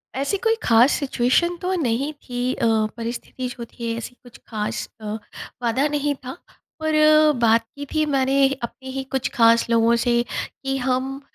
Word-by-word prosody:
ऐसी 280 +9 0
कोई 450 +2 +1
ख़ास 235 +4 +5
सिचुएशन 280 +6 +1
तो 370 0 -1
नहीं 260 +4 0
थी 250 -3 -3
अ, - - -1 0.3
परिस्थिति 235 +2 -5
जो 240 -1 -7
थी, 230 0 -5
ऐसी 235 +2 -7
कुछ 245 -1 -15
खास 210 -2 -3
अ, 210 -1 -4 0.5
वादा 250 +5 +2
नहीं 290 0 0
था। 255 - -5 0.5
पर 315 0 0 0.5
बात 230 0 +4
की 285 0 -6
थी 310 0 +2
मैंने 275 -1 +3 0.2
अपने 260 +3 -7
ही 270 0 -3
कुछ 265 -1 -1
ख़ास 230 -1 +4
लोगों 230 0 +4
से, 240 0 +2 0.4
कि 270 0 -1
हम 265 +2 -1
255 Hz, 165 wpm, -22 LUFS, 235-280 Hz, 0.5 s, ख़ास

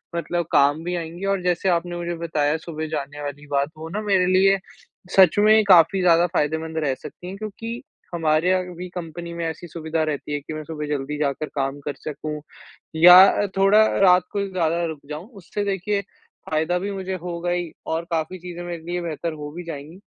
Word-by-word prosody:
मतलब 170 0 -1
काम 145 +3 +3
भी 180 +1 -2
आएँगी। 170 +2 -5
और 195 -1 0
जैसे 180 +1 +1
आपने 175 0 0
मुझे 175 0 -3
बताया 155 -2 0
सुबह 160 -1 -6
जाने 145 -1 -5
वाली 145 0 -6
बात, 140 0 0
वो 160 +1 -7
ना 205 +6 -3
मेरे 195 -3 +2
लिए 190 +2 +4 0.6
सच 190 -1 +6
में 215 +1 +6
काफ़ी 185 +1 +6
ज़्यादा 175 -1 +5
फ़ायदेमंद 160 -1 -1
रह 140 -3 +1
सकती 175 - -11
है 190 - -6
क्योंकि 225 +3 -6 0.3
हमारे 160 +1 +2
यहाँ 185 0 +2
भी 180 +2 -6
कंपनी 170 0 -6
में 170 0 -3
ऐसी 165 +2 -5
सुविधा 160 -1 -2
रहती 150 -1 -3
है 145 - -1
कि 145 +2 -8
मैं 155 0 -5
सुबह 150 -1 -5
जल्दी 145 0 -3
जाकर 145 0 -1
काम 135 0 -2
कर 145 - -2
सकूँ, 150 0 -5 0.5
या 175 +3 +9
अ, 205 +1 +2
थोड़ा 200 +3 +6
रात 180 -2 +6
को 200 -1 -1
ज़्यादा 170 -3 0
रुक 160 -3 -5
जाऊँ। 155 +5 -6
उससे 195 +3 -4
देखिए 200 +1 -1 0.5
फ़ायदा 160 +3 +1
भी 200 +3 -3
मुझे 190 -1 -4
होगा 175 0 -3
ही 175 -2 -2 0.2
और 165 +1 -2
काफ़ी 165 +3 -2
चीज़ें 175 0 -7
मेरे 175 -1 -6
लिए 175 +1 -3
बेहतर 165 0 -3
हो 150 -1 -7
भी 175 +3 -7
जाएँगी। 160 +2 -8
170 Hz, 200 wpm, -23 LUFS, 155-180 Hz, 0.6 s, या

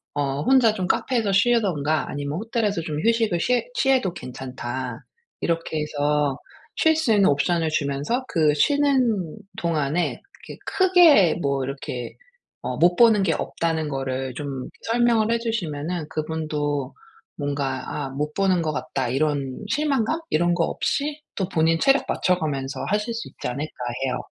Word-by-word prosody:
어 140 -1 -1
혼자 250 - +4
좀 185 -4 -3
카페에서 230 -6 +1
쉬든가 190 -9 +2
아니면 145 +2 -3
호텔에서 215 -5 -1
좀 155 -2 -4
휴식을 225 -6 +2
쉬해 250 - +1
취해도 265 - +2
괜찮다." 125 -4 -6 0.4
이렇게 165 -2 -1
해서 145 -2 0 0.4
쉴 320 0 +4
수 310 -8 +1
있는 200 -2 +5
옵션을 165 +3 +1
주면서 145 - -1
그 155 -3 +3
쉬는 255 - +2 0.2
동안에 165 0 -1 0.2
그렇게 - - -9
크게 350 - +5
뭐 140 -2 0
이렇게 130 -2 -6 0.5
어 - - -3
못 175 +1 +4
보는 225 -4 +6
게 165 -4 +2
없다는 160 -1 -2
거를 135 -2 -3
좀 135 -3 -5 0.2
설명을 230 -1 +2
해 235 - +2
주시면은 175 -8 -3
그분도 150 -3 -2 0.4
뭔가 140 -2 -2 0.2
'아 - - -5
못 150 +3 -3
보는 190 -3 +2
것 155 -2 -1
같다.' 130 -3 -2
이런 140 - -1
실망감? 285 +2 +1
이런 175 +2 +2
거 170 - +2
없이 295 +1 -2
또 190 -4 -1
본인 165 -1 +2
체력 275 +7 +4
맞춰 180 -1 +1
가면서 135 -3 -3
하실 210 +3 0
수 230 0 -5
있지 - - -7
않을까 140 +5 -3 0.4
해요. 125 - -1
165 Hz, 300 characters per minute, -23 LUFS, 145-225 Hz, 0.5 s, 보는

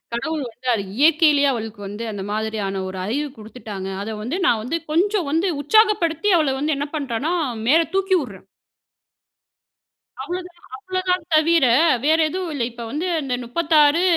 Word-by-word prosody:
கடவுள் 310 +4 -3
வந்து 250 +3 -12
அது 200 -3 -1
இயற்கையிலேயே 300 -1 +4
அவளுக்கு 220 -3 -6
வந்து 205 +3 -6
அந்த 195 -2 -6
மாதிரியான 210 -3 -2
ஒரு 185 0 -7
அறிவு 280 +9 -1
குடுத்துவிட்டாங்க. 210 -3 -8
அத 220 +1 -5
வந்து 285 +11 -3
நான் 225 -7 +2
வந்து 325 +8 -2
கொஞ்சம் 370 +1 +1
வந்து 340 +4 +1
உற்சாகப்படுத்தி 415 0 +3
அவள 295 -4 +1
வந்து 300 +1 0
என்ன 285 +1 -2
பண்ணுறனா 280 +4 -2 0.4
மேல 325 +3 +6
தூக்கி 390 -1 +2
விடுறேன். 195 -7 -10 1.8
அவ்ளோ 355 +1 -4
தான் 345 -1 -26
அவ்வளவுதான் 370 +3 -2
தவிர 320 0 +4 0.4
வேற 315 +2 +4
எதுவும் 360 0 -4
இல்ல. 265 - -2
இப்போ 235 -1 -8
வந்து 310 +7 -3 0.2
இந்த 260 -2 -2
36 305 +3 +3
295 Hz, 155 wpm, -21 LUFS, 225-335 Hz, 1.8 s, மேல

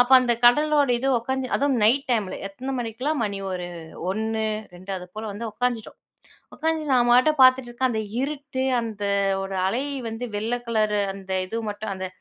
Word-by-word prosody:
அப்ப 245 +1 +4
அந்த 245 -1 +2
கடலோட 290 +2 +5
இது 270 +2 -1
உக்காந்து 260 +2 -2
அதுவும் 280 -1 +1
நைட் 270 +6 +3
டைம்ல 215 -6 0
எத்தன 260 +7 -5
மணிக்லாம், 250 +6 -2
மணி 200 -1 -3
ஒரு 180 -1 -4 0.5
1 220 +1 -1 0.3
2 185 +2 -8
அது 180 - -10
போல 220 - -4
வந்து 220 +4 -5
உக்காந்துட்டோம் 240 -2 -2 0.6
உக்காந்து 320 0 -1
நான் 240 -1 +4
பாட்டுப் 275 +4 +4
பார்த்துட்ருக்கேன், 255 -1 +4
அந்த 220 -2 -1 0.2
இருட்டு 275 -1 -3 0.2
அந்த 215 -3 -5 0.4
வோட 195 0 -4
அலை 245 +8 0 0.2
வந்து 225 +2 -5
வெள்ள 225 +4 -1
கலரு 215 -2 +1
அந்த 190 -1 -7
இது 225 +5 -4
மட்டும் 205 0 -5
அந்த 185 0 -4
240 Hz, 165 wpm, -24 LUFS, 210-265 Hz, 0.6 s, கடலோட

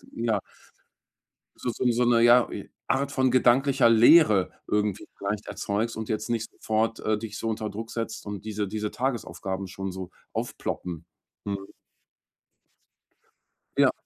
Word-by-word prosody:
ja. 115 -3 +1 1.2
So 125 - -3
so - - -4
'n 125 - +4
so 120 +1 +2
'ne 120 -1 +4
ja, 120 +1 +6
i - - -7 0.2
Art 140 +1 +1
von 130 -2 +2
gedanklicher 130 0 +4
Leere 115 - +6 0.2
irgendwie 105 -1 0
vielleicht 100 +1 -3
erzeugst 110 +3 -2
und 110 -1 -5
jetzt 110 +1 -2
nicht 115 -1 -1
sofort, 110 +1 -1
äh, 110 0 0
dich 105 -1 -6
so 115 - -3
unter 110 -1 -2
Druck 110 +3 -7
setzt 115 -2 -4
und 105 -1 -6
diese 105 -1 -2
diese 105 +1 -3
Tagesaufgaben 100 -6 -3
schon 95 +1 -5
so 95 -1 -7 0.2
aufploppen. 85 -3 -4 0.4
Mhm. 100 -1 -3 2.1
Ja. - - +5
110 Hz, 145 wpm, -26 LUFS, 100-120 Hz, 2.1 s, ja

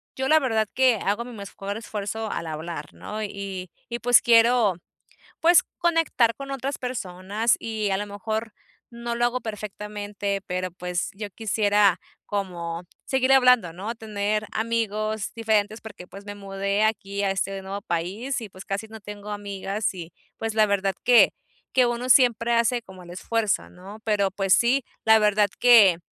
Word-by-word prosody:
yo 265 0 -2
la 315 +3 +6
verdad 225 -6 0
que 260 -2 +4
hago 205 +4 0
mi 245 - -10
mejor 200 -1 -6
esfuerzo 220 0 -4
al 165 - -4
hablar, 155 -1 -6
¿no? 215 +1 -6
Y 195 -3 -6 0.2
y 235 0 -4
pues 245 0 +5
quiero, 230 -3 +5 0.7
pues, 340 +1 +6 0.2
conectar 330 -9 +2
con 275 0 -8
otras 275 +1 -3
personas 215 -2 -1
y 220 -2 -2
a 190 - +1
lo 205 - -3
mejor 220 +2 -4 0.3
no 235 0 -5
lo 240 0 +1
hago 250 +1 -1
perfectamente, 205 -2 -4
pero 185 0 -2
pues 180 0 -3
yo 205 +1 -6
quisiera 205 -3 +2 0.3
como 175 -4 -4 0.2
seguir 265 0 +2
hablando, 250 -9 +5
¿no? 205 +6 -5
Tener 215 -1 -2
amigos 220 -2 -1
diferentes 215 -1 0
porque, 215 -5 -10
pues, 200 +1 -11
me 205 0 -7
mudé 200 +1 -1
aquí 200 -2 -1
a 195 - +1
este 195 0 -2
nuevo 195 +1 -6
país 195 +11 -2
y, 220 - -7
pues, 185 0 -12
casi 200 +3 -4
no 220 0 -10
tengo 205 0 -9
amigas, 200 0 -3
y, 170 -2 -8 0.3
pues, 225 -1 -3
la 215 -1 +5
verdad 195 -1 0
que 245 -1 +6 0.4
que 255 -1 +4
uno 240 +1 -2
siempre 240 -2 +4
hace 235 +1 +2
como 190 -4 -13
el 175 - -12
esfuerzo, 215 +3 -1
¿no? 195 +4 -12
Pero, 200 -3 +1
pues 195 -1 0
sí, 245 +2 +3 0.2
la 220 0 +7
verdad 210 -1 +3
que 215 -8 +7
210 Hz, 170 wpm, -25 LUFS, 195-230 Hz, 0.7 s, la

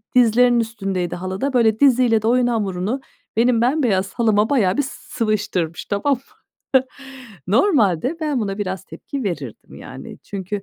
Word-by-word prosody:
dizlerinin 245 0 +5
üstündeydi 195 -6 -2
halıda. 190 +9 -3
Böyle, 220 -3 +3
diziyle 250 -5 +4
de 220 - -1
oyun 245 +1 +3
hamurunu 210 +2 -1 0.4
benim 235 0 +3
bembeyaz 235 -8 +1
halıma 220 -2 +2
bayağı 205 -9 +2
bir - - +3
s 265 - -5 0.3
sıvıştırmış. 205 -7 -1
Tamam 210 +8 0
mı? 255 - -3 1.3
Normalde 235 - +2
ben 300 -5 -1
buna 200 -2 -3
biraz 190 -2 -3
tepki 275 -4 -7
verirdim, 145 - -6
yani. - - -10
Çünkü 200 0 -5
220 Hz, 140 wpm, -20 LUFS, 195-250 Hz, 1.3 s, dizlerinin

